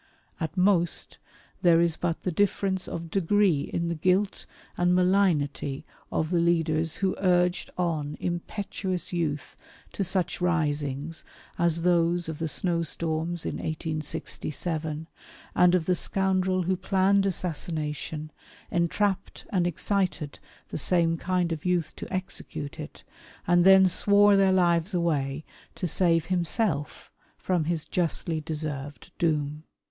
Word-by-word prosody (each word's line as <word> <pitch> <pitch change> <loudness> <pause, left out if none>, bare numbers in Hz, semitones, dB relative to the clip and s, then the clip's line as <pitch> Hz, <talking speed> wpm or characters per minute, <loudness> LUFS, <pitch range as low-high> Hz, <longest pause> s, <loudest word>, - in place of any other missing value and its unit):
At 160 +4 -4
most 180 -3 +2 0.4
there 170 -2 +5
is 170 -1 +2
but 170 -1 -2
the 180 - -1
difference 190 +1 0
of 165 -1 -6
degree 195 -4 +2
in 170 0 -1
the 170 - -1
guilt 185 +5 0 0.3
and 180 0 +2
malignity 180 -7 +1 0.3
of 155 +1 -1
the 175 - +3
leaders 165 -2 +1
who 185 - +1
urged 180 -1 +2
on 155 -5 -1
impetuous 185 +1 -3
youth 155 -4 -2 0.4
to 200 - -1
such 185 -1 -1
risings 150 -3 -1 0.4
as 170 -1 +1
those 175 -1 +2
of 160 -2 -5
the 165 - -1
snowstorms 165 0 -1
in - - -3
1867, 155 0 -4 0.5
and 180 0 +5
of 170 -3 +1
the 185 - +2
scoundrel 185 0 +1
who 185 +2 +1
planned 195 +1 +2
assassination, 155 -3 -3 0.4
entrapped 190 +3 0
and 180 -3 +2
excited 175 -3 -1 0.3
the - - -3
same 170 0 +2
kind 180 0 -1
of 160 -2 -3
youth 175 -4 0
to - - -8
execute 160 -5 -5
it, 150 0 -9 0.4
and 175 0 +4
then 190 0 +8
swore 205 +2 +5
their 195 -1 +4
lives 175 0 +2
away 150 -4 -1 0.3
to 180 - -2
save 165 -1 +2
himself 175 -3 0 0.3
from 180 -4 0
his 165 -1 -1
justly 165 -2 -1
deserved 150 0 -5
doom. 150 -2 0
170 Hz, 130 wpm, -27 LUFS, 155-185 Hz, 0.5 s, then